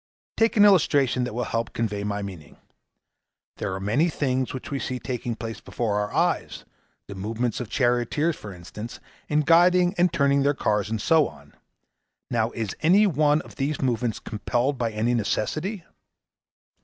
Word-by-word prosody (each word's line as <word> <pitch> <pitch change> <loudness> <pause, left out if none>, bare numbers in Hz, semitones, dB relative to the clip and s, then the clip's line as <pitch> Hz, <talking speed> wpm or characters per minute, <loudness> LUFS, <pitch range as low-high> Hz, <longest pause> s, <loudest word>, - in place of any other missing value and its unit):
Take 225 0 +2
an 205 - +8
illustration 140 -10 +4
that 125 - -6
will 125 - -1
help 115 -1 -2
to - - -18
convey 105 -3 -2
my 105 0 -2
meaning. 90 -7 -9 1.0
There 95 - -3
are - - -4
many 115 - +1
things 130 -4 -1
which 130 - -7
we 140 - -1
see 130 - -3
taking 120 -2 -4
place 115 0 -6
before 105 -4 -2
our 105 0 -2
eyes - - -1 0.4
the 100 - -8
movements 110 +5 -2
of 120 -4 -5
charioteers, 125 +6 +1
for 105 - -9
instance, 100 +6 -9 0.3
in 150 0 +3
guiding 175 +3 +5
and 175 -1 +4
turning 140 -4 +2
their 140 +1 +2
cars, 105 -4 0
and 110 -1 -2
so 160 +7 +4
on. - - -15 0.8
Now, 115 -1 +1
is 110 -4 -4
any 190 +7 +5
one 150 -4 +3
of - - -15
these 145 +2 -1
movements 120 -3 0
compelled 120 +5 -1
by 115 -2 0
any 110 +3 0
necessity?' 155 - -1
125 Hz, 170 wpm, -25 LUFS, 110-150 Hz, 1.0 s, an